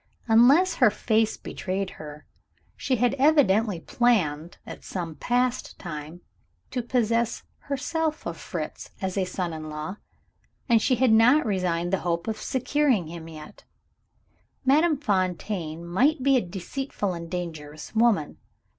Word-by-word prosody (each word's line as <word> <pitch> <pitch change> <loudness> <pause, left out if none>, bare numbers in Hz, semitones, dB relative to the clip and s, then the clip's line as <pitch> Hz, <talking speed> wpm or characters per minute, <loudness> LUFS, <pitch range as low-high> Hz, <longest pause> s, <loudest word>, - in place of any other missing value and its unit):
Unless 260 +11 +5
her 245 -5 +6
face 220 +1 +1
betrayed 190 0 -4
her, 150 0 -10 0.5
she 265 -2 0
had 245 0 +2
evidently 225 - +3
planned, 175 -8 0
at - - -9
some 170 -4 -5
past 245 +7 -1
time, 160 0 -7 0.5
to 250 - -1
possess 235 -1 0 0.2
herself 310 +3 -2
of - - -3
Fritz - - -6
as 190 -1 -3
a 195 -2 +1
son 180 -2 -3
in 155 -1 -6
law, 155 +6 -5 0.7
and 230 -3 +4
she 255 - +2
had 250 0 +3
not 245 +7 +5
resigned 180 -3 -1
the 195 - +2
hope 170 +1 -2
of 220 -1 -2
securing 260 - +1
him 165 -1 -8
yet. 155 -1 -12 1.0
Madame 305 +4 +4
Fontaine 185 - -2
might 260 - +2
be 275 0 +4
a 255 - +4
deceitful 195 +3 -4
and 170 -1 -7
dangerous 160 -4 -6
woman. 220 -9 +2
205 Hz, 135 wpm, -26 LUFS, 170-250 Hz, 1.0 s, her